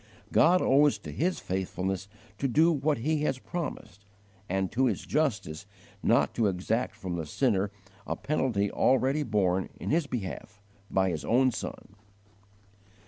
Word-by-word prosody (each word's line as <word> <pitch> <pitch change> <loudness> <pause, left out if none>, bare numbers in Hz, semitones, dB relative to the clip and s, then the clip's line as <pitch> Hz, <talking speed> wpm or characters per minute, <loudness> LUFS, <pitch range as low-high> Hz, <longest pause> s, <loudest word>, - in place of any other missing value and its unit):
God 180 +3 +5
owes 145 +2 +4
to - - -9
His 180 +4 0
faithfulness 95 0 -3 0.3
to 135 - +1
do 160 +7 +4
what 150 -1 +1
He 150 +5 0
has 140 -3 0
promised, 130 - -6 0.5
and 95 0 0
to 130 +5 +2
His 110 - -2
justice 105 - -1 0.3
not - - +3
to 115 - +2
exact 105 +5 -1
from 95 -5 -4
the 80 - -3
sinner 100 - +1 0.4
a - - -1
penalty 120 -9 0
already 135 +3 +2
borne 95 -7 +1
in - - -3
his 160 -1 +2
behalf 105 -3 -5 0.3
by 95 -1 +2
His 80 - -4
own 130 +2 +3
Son. 100 - -7
115 Hz, 145 wpm, -29 LUFS, 95-140 Hz, 0.5 s, God